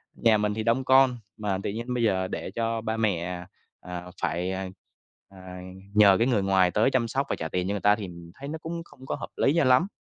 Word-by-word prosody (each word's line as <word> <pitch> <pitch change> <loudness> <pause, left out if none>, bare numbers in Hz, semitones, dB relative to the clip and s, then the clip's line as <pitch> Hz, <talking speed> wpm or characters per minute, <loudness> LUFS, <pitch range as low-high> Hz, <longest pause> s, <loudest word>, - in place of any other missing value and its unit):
nhà 110 -2 +4
mình 105 0 0
thì 110 - -3
đông 115 +4 +2
con, 130 -1 +5 0.2
mà 105 -3 -1
tự - - -1
nhiên 120 +4 -4
bây 120 -1 0
giờ 95 -4 +1
để - - -5
cho 115 -1 -1
ba 110 0 -2
mẹ, 90 -4 -1 0.3
ờ, 90 0 -8
phải, 90 +2 -1
ờ, 95 0 -3 0.6
ờ, 95 - -17 0.6
nhờ 100 -2 +7
cái 115 - +2
người 115 -7 +2
ngoài 95 -2 +3
tới 110 +7 +2
chăm 125 -3 +1
sóc 135 +4 -1
và - - 0
trả 80 - -4
tiền 90 +2 -1
cho - - 0
người 100 - -3
ta 105 0 +5
thì 105 -3 -6 0.3
thấy 140 - -8
nó 160 - -4
cũng 170 +1 -5
không 130 -5 -15
có - - -2
hợp - - -7
lý 140 - +3
cho 170 - +4
lắm, 130 +9 +4
110 Hz, 245 wpm, -26 LUFS, 95-125 Hz, 0.6 s, nhờ